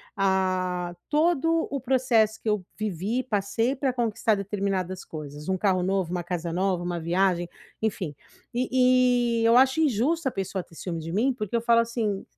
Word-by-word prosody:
ah, 185 -2 0 0.2
todo 325 +1 +2
o 275 -3 -2
processo 235 -4 +2
que - - -9
eu 210 -3 +1
vivi, 215 +4 -2
passei, 225 +3 0
para 270 -1 0
conquistar 225 -3 +1
determinadas 195 -2 -2
coisas, 150 +1 -8
um 190 - +1
carro 185 -2 +2
novo, 190 -2 0
uma 180 -1 -2
casa 170 -1 -3
nova, 185 -1 0
uma 175 -1 -2
viagem, 175 +1 +1 0.3
enfim, 185 -9 -2 0.4
e 250 -1 +3
e - - +1
eu 230 +2 +6
acho 265 +4 +4
injusto 285 +3 +1
a - - -11
pessoa 190 -1 -3
ter 165 - -19
ciúme 170 0 -4
de 160 +1 -6
mim, 240 +8 +2
porque 215 -2 -4
eu 230 - +2
falo 235 0 +4
assim: 225 -4 -2
205 Hz, 175 wpm, -26 LUFS, 185-245 Hz, 0.4 s, eu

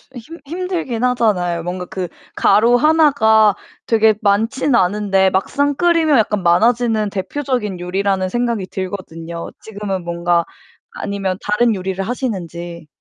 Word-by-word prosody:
히 - - -6
힘 320 +9 -12
힘들기는 330 -7 -3
하잖아요. 180 -8 0
뭔가 180 +2 -5
그 185 0 -5 0.3
가루 225 +4 +4
하나가 235 -8 +4 0.3
되게 220 -1 +3
많지는 225 +7 +1
않은데 195 -1 +2
막상 285 +10 0
끓이면 330 -3 +3
약간 210 -2 +1
많아지는 220 +3 +2
대표적인 210 -1 -3
요리라는 190 +1 -1
생각이 235 -2 -1
들거든요. 170 -3 -6
지금은 205 -4 -5
뭔가 170 0 0 0.5
아니면 195 -2 -3
다른 215 +2 +2
요리를 190 +1 -3
하시는지. 175 - -5
205 Hz, 320 characters per minute, -18 LUFS, 185-240 Hz, 0.5 s, 가루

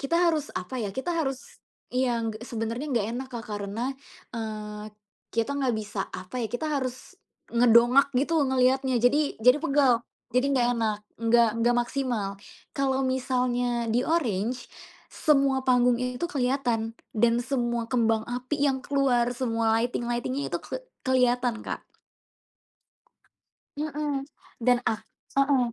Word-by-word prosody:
kita 280 +4 0
harus 305 -3 -2
apa 185 +8 -4
ya, 205 - -2
kita 305 +7 -2
harus 270 -5 -3 0.3
iya 245 -2 +1
g 220 - -4
sebenarnya 230 +4 -3
nggak 230 -5 +1
enak 260 +2 -4
Kak 235 -1 -5
karena, 210 +5 -3 0.4
eee, 215 -2 -5 0.5
kita 230 +4 0
nggak 260 -4 +1
bisa 210 -2 -4
apa 185 +7 -6
ya, 225 - -2
kita 245 +6 -2
harus, 260 0 -3 0.4
ngedongak 240 +3 +6
gitu 310 +5 +2
ngelihatnya, 260 0 +2
jadi 280 +5 +2
jadi 250 +5 +6
pegel, 270 -4 +3 0.3
jadi 250 +2 +3
nggak 250 -3 +3
enak, 215 -2 0 0.2
nggak 230 0 +4
nggak 240 +1 +3
maksimal, 240 -5 -1 0.4
kalau 270 -1 +1
misalnya 250 -2 0
di 240 - +3
oranye, 245 - 0 0.6
semua 275 -3 +3
panggungnya 250 0 +3
itu - - -2
kelihatan 245 -5 0 0.2
dan 235 +1 +4
semua 240 -3 -1
kembang 225 -3 +2
api 250 +4 -3
yang 265 -1 +1
keluar 255 -4 +2
semua 230 -3 +1
lighting-lighting-nya 240 +3 -2
itu - - 0
ke - - -6 0.2
kelihatan 250 -2 +2
Kak. - - -5 1.9
Mhm, 295 -2 -2 0.4
dan 245 0 +5
ak 220 0 0 0.4
heeh. 275 -4 +3
245 Hz, 135 wpm, -27 LUFS, 230-270 Hz, 1.9 s, ngedongak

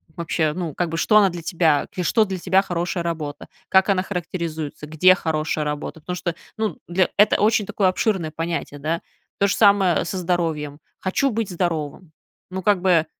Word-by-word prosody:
Вообще, 160 -2 -1
ну, 170 -3 -4
как 175 +2 -1
бы, 165 - -3
что 210 +5 +4
она 200 -2 +6
для 175 -1 -7
тебя, 160 -3 +1
что 215 +5 +3
для 190 -2 -4
тебя 190 +2 +3
хорошая 175 -1 -2
работа, 155 -4 -4 0.2
как 190 +1 +4
она 190 -2 +3
характеризуется, 165 -5 -5
где 160 +4 +5
хорошая 155 -3 -1
работа, 150 +2 -4
потому 180 +3 -5
что, 175 -1 -3 0.2
ну 220 -1 -2
для 180 +1 +2
это 210 +1 +4
очень 215 0 +3
такое 195 -1 +1
обширное 185 -4 0
понятие, 165 -2 -4
да. 160 +4 -2 0.4
То 200 - +4
же 200 - 0
самое, 200 -5 +4
э, - - -3
со 190 - -4
здоровьем. 165 -5 -2 0.2
Хочу 235 +9 0
быть 225 -2 -2
здоровым. 170 -2 -3 0.4
Ну, 190 +1 -4
как 200 -1 +2
бы, 175 -4 +3
175 Hz, 185 wpm, -22 LUFS, 160-190 Hz, 0.4 s, она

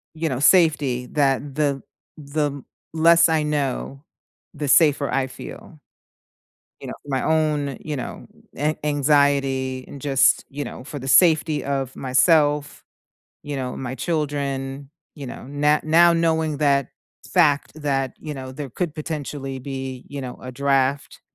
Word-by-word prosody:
you 160 +1 -2
know, 130 -2 -2
safety 145 -8 +3
that 140 0 0
the 145 -3 0 0.4
the 145 -1 -3 0.3
less 165 +1 +5
I 160 -1 +2
know, 140 -1 -2 0.5
the 145 -1 -4
safer 145 -1 +4
I 135 -1 0
feel. 150 +4 -11 1.0
You - - -8
know, - - -5
for 145 - -13
my 135 -1 0
own, 150 -4 0
you 150 -1 -5
know, 130 - -6 0.3
an 150 +2 0
anxiety 140 -3 +1
and 140 - -10
just, 135 -2 +3
you 145 +1 -5
know, 125 - -8
for 145 +1 -7
the 135 - -7
safety 155 -1 +4
of 135 -2 -3
myself, 145 +2 +2 0.6
you 145 - -5
know, 130 -2 -4
my 130 -1 -5
children, 140 -2 -3 0.2
you 145 -3 -8
know, - - -8
no 150 +2 +2
now 170 +2 +5
knowing 160 -2 +1
that 140 -2 +2 0.4
fact 150 -6 +3
that, 135 -3 -1
you 150 -1 -6
know, 130 -1 -7
there 140 +1 -6
could 155 +5 -4
potentially 145 -3 -5
be, 130 -1 -6
you 140 0 -6
know, 125 -2 -7
a 130 - -6
draft 140 +1 0
145 Hz, 150 wpm, -22 LUFS, 135-150 Hz, 1.0 s, less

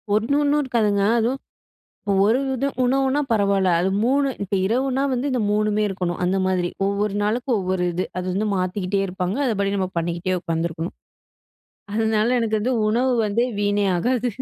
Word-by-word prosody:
1 225 +7 +1
ஒன்னும் 295 +1 +2
இருக்காதுங்க 215 -6 +1 0.2
அதுவும் 250 +4 0 0.9
ஒரு 225 +5 +3 0.2
இதும், 275 +2 -2
உணவுனா 270 +3 +2
பரவால்ல, 200 -3 +2
அது 190 - +1 0.2
3 275 +3 +2 0.2
இப்ப 200 - -2
இரவுனா 260 +5 0
வந்து 255 +3 -1
இந்த 250 - 0
3மே 210 0 +1
இருக்கணும். 180 -3 -3
அந்த 190 +2 +1
மாரி 180 -2 0 0.2
ஒவ்வொரு 200 0 -1
நாளுக்கு 240 +5 -1
ஒவ்வொரு 185 -1 -1
இது. 180 - -1
அது 180 - -3
வந்து 210 +3 0
மாத்திக்கிட்டே 185 +1 -1
இருப்பாங்க, 185 +4 -3
அதுபடி 200 -3 0
நம்ம 185 -1 -1
பண்ணிக்கிட்டே 175 +2 -2
உட்காந்துருக்கணும். 165 0 -3 1.0
அதனால 220 0 +1
எனக்கு 220 -2 0
வந்து 250 +3 0
உணவு 250 +4 +2
வந்து 210 +3 +1 0.2
வீணே 205 0 +1
ஆகாது. 245 +5 0
210 Hz, 155 wpm, -22 LUFS, 185-245 Hz, 1.0 s, ஒரு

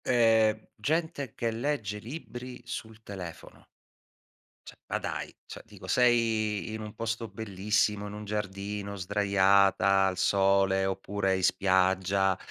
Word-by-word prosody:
Ehm, 110 -3 +3
gente 160 -5 -1
che 115 -1 -1
legge 115 -4 -2
libri 125 0 -8
sul 110 -3 -7
telefono. 90 -6 -9 1.0
Cioè - - -11
ma - - 0
dai, - - -4
cioè - - -9
dico - - -12
sei 115 -3 +2
in 110 - -5
un 105 -1 -7
posto 115 0 -3
bellissimo, 105 0 -1
in 105 - -8
un 105 0 -7
giardino 100 0 -4
sdraiata 100 0 +3
al 95 -1 -1
sole, 95 0 +3
oppure 95 0 -1
in 95 - -4
spiaggia 95 +1 +2
105 Hz, 125 wpm, -29 LUFS, 95-115 Hz, 1.0 s, Ehm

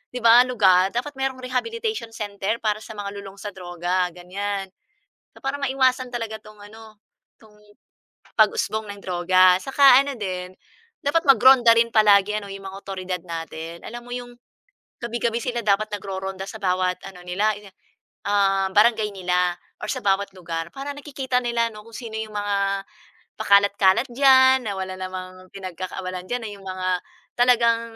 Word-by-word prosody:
‘di 250 - -5
ba, 230 +1 +8
lugar 190 -6 +4
dapat 250 +5 -2
mayroong 265 -1 -2
rehabilitation 435 - -3
center 205 0 -3
para 215 -1 0
sa 220 - -10
mga 200 -1 -5
lulong 195 -1 -10
sa 205 +1 -6
droga 180 0 -2
ganiyan. 195 +2 -4 0.7
Para 270 +1 -2
maiwasan 260 -2 +1
talaga 225 -2 -4
'tong 215 -1 -16
ano, 220 -1 -15 0.4
'tong 215 -2 -20 0.8
pag-usbong 215 0 +1
ng 200 - -12
droga. 185 0 +4
Saka 270 -1 +6
ano 280 -1 -4
din, 185 -2 -4 0.5
dapat 330 +4 +1
mag-ronda 260 -3 +7
rin 230 0 +4
palagi 210 -1 +5
ano, 200 -1 -10
'yong 195 0 -9
mga 190 - -9
awtoridad 185 -2 -5
natin. 165 0 -7
Alam 240 +1 -8
mo 245 - -10
'yong 245 0 -6 0.7
gabi-gabi 235 0 -1
sila 240 0 -2
dapat 210 0 +2
nagroronda 190 -1 -5
sa 220 - -9
bawat 185 -1 0
ano 185 -2 -11
nila, 200 +5 +1
ine 205 -1 -14 0.6
um, 195 -1 +2
barangay 220 0 +4
nila 180 -1 0 0.3
or - - -4
sa - - -2
bawat 200 0 +1
lugar. 165 -2 -5
Para 275 +1 -4
nakikita 270 -3 -2
nila 235 -1 0
'no, 210 0 -12
kung 230 - -10
sino 230 -3 -7
yung 215 -1 -7
mga 200 -1 -1 0.5
pakalat-kalat 200 +3 +4
diyan 260 0 +5
na - - -1
wala 190 0 -4
namang 185 0 -7
pinagkakaabalahan 185 -1 -6
diyan, 245 0 -2
na 215 - -5
yung 200 -1 -11
mga 185 0 -3 0.5
talagang 235 -2 +4
205 Hz, 155 wpm, -23 LUFS, 185-240 Hz, 0.8 s, ba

